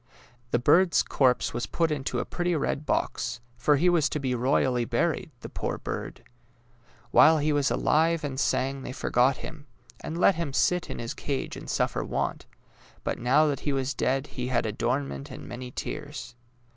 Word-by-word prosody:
The 120 - +2
bird's 170 +7 +4
corpse 125 -3 +2
was 120 +1 -3
put 165 -2 0
into 140 -3 -2
a - - -1
pretty 175 -1 -1
red 150 0 -2
box, - - -1 0.2
for 135 +5 +3
he 165 +6 +2
was 170 -4 +3
to 150 - -2
be 130 -2 -1
royally 125 0 +2
buried 115 - 0
— - - -36
the - - -6
poor - - -3
bird! - - -6 0.9
While 160 0 +7
he 150 0 +1
was 145 -1 +2
alive 165 +1 +2
and 135 -2 -3
sang 135 -1 0
they 125 - -6
forgot 125 +1 +2
him, 155 -2 -9 0.3
and 160 - -5
let 185 - +5
him 165 -5 -3
sit 180 +5 +1
in - - -5
his 115 0 -4
cage 140 -2 -3
and - - -9
su:ffer - - 0
want; - - -3 0.6
but - - -2
now 135 +6 +4
that 145 -2 0
he 145 - -1
was 135 0 -1
dead 135 +2 0
he 125 -4 -5
had 125 -3 +1
adornment 130 +6 -2
and 130 - -9
many 125 +1 -7
tears. - - -6
140 Hz, 185 wpm, -27 LUFS, 125-155 Hz, 0.9 s, While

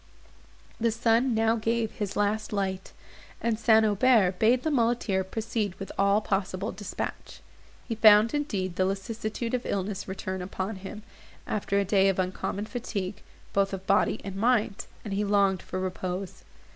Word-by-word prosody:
The 230 0 +2
sun 230 +2 +2
now 225 +1 +2
gave 225 0 0
his 205 -2 -4
last 210 +1 0
light, 190 -2 -2 0.5
and 225 -1 -1
St. 220 -1 +5
Aubert 205 -3 +3
bade 240 +3 +4
the 315 - 0
muleteer 230 -6 +1
proceed 215 0 -3
with 195 - -7
all 200 +2 +3
possible 195 0 -2
dispatch. 205 0 -6 0.5
He 230 - -2
found, 215 0 +6
indeed, 200 - -2
the 185 - +3
lassitude 215 +4 -3
of 250 -1 0
illness 195 0 -3
return 190 -1 -4
upon 190 +3 -4
him, 200 +3 -8 0.4
after 200 -1 -1
a 200 - +2
day 195 0 +4
of 195 - 0
uncommon 185 +2 -2
fatigue, 210 -5 -4 0.3
both 195 0 +1
of 190 0 -5
body - - +2
and 195 -1 -6
mind, 220 -1 +1 0.2
and 205 - -4
he 200 +1 0
longed 200 -2 +2
for 185 - -5
repose. 185 0 -4
205 Hz, 160 wpm, -27 LUFS, 190-225 Hz, 0.5 s, found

